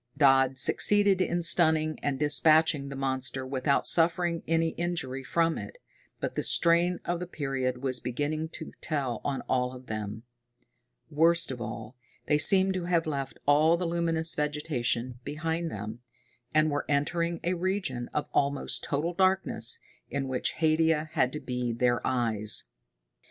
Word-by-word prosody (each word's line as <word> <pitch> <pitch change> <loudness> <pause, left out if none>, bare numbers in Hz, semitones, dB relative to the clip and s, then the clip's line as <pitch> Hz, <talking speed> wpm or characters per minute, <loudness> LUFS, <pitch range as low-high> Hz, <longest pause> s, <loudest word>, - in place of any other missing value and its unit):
Dodd 135 -2 +4
succeeded 200 +6 +2
in 175 -1 0
stunning 160 -2 +3
and 140 -2 -1
dispatching 150 0 +3
the 140 - -7
monster 130 -1 -2
without 130 +1 0
suffering 170 0 +2
any 165 0 +1
injury 160 -6 -3
from 165 +5 0
it, - - -9 0.4
but - - -3
the - - -2
strain 170 +1 +3
of 175 0 -2
the 180 - -5
period 135 -5 -3
was 130 -2 0
beginning 150 +6 -3
to - - -6
tell 135 -7 -3
on 140 -2 -2
all 125 0 -1
of 130 0 -12
them. 110 0 -5 0.9
Worst 165 +1 +3
of 125 -2 -6
all, 115 +1 -7 0.3
they 150 - +2
seemed 190 +4 +5
to 185 -2 -3
have 170 -2 +1
left 140 -3 -4
all 155 +4 +4
the 180 - -3
luminous 165 -1 +2
vegetation 130 -5 -2
behind 160 +4 -3
them, 105 -1 -7 0.5
and 155 0 +2
were 145 0 -2
entering 170 +4 0
a 175 - 0
region 180 -9 -2
of 150 - -2
almost 140 0 0
total 155 +5 -2
darkness, 185 -11 +2 0.3
in 140 -1 -3
which 130 -1 -2
Haidia 160 -1 +1
had 130 -5 +1
to 150 - -5
be 125 -3 -3
their 120 0 +1
eyes. 110 -4 +1
150 Hz, 150 wpm, -28 LUFS, 130-170 Hz, 0.9 s, seemed